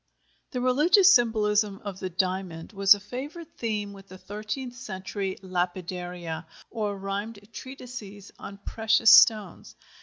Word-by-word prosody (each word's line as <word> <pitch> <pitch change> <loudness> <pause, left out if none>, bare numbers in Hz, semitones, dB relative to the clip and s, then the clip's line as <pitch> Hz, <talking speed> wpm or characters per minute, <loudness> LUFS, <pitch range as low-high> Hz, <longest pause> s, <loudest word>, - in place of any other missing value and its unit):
The 250 - -4
religious 335 - +5
symbolism 210 -3 +2
of 195 -2 -6
the 185 - -4
diamond 185 -1 -3
was 195 0 +6
a - - -9
favorite 285 - -8
theme 210 -3 -2
with 195 0 -14
the 185 - -12
thirteenth 215 +6 -6
century 195 -4 -5
"lapidaria," 180 -2 -4 0.2
or 210 -3 -3
rhymed 200 +3 -4 0.2
treatises 240 -7 -9
on 200 - -9
precious 220 0 +4
stones. 210 -6 +4
205 Hz, 125 wpm, -26 LUFS, 190-230 Hz, 0.2 s, was